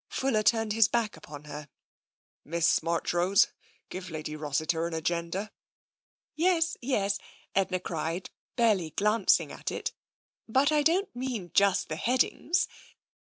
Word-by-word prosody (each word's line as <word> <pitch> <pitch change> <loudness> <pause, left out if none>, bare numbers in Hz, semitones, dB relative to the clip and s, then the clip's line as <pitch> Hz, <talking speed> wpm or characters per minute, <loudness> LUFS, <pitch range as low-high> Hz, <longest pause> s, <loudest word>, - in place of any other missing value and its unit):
" - - -65
Fuller 260 -5 +1
turned 225 -1 +2
his 225 0 +5
back 230 -3 0
upon 145 -1 -11
her. 150 0 -8 0.4
" - - -72 0.3
Miss 170 +1 +2
Marchrose, 175 +3 +2 0.4
give 185 0 -6
Lady 155 -1 -5
Rossiter 155 +2 -1
an 170 - -4
agenda." 170 +5 -2 0.4
" - - -73
Yes, 330 0 +2
yes," 205 -6 0 0.3
Edna 190 -1 +1
cried, 170 0 -4 0.2
barely 215 -9 +2
glancing 210 +5 +2
at - - -5
it, - - -3 0.3
" - - -75
but 270 +6 +3
I 300 -1 +3
don't 340 +2 +1
mean 245 -9 -4
just 200 -1 +3
the 155 - -4
headings. 255 - +1
195 Hz, 145 wpm, -29 LUFS, 165-235 Hz, 0.4 s, his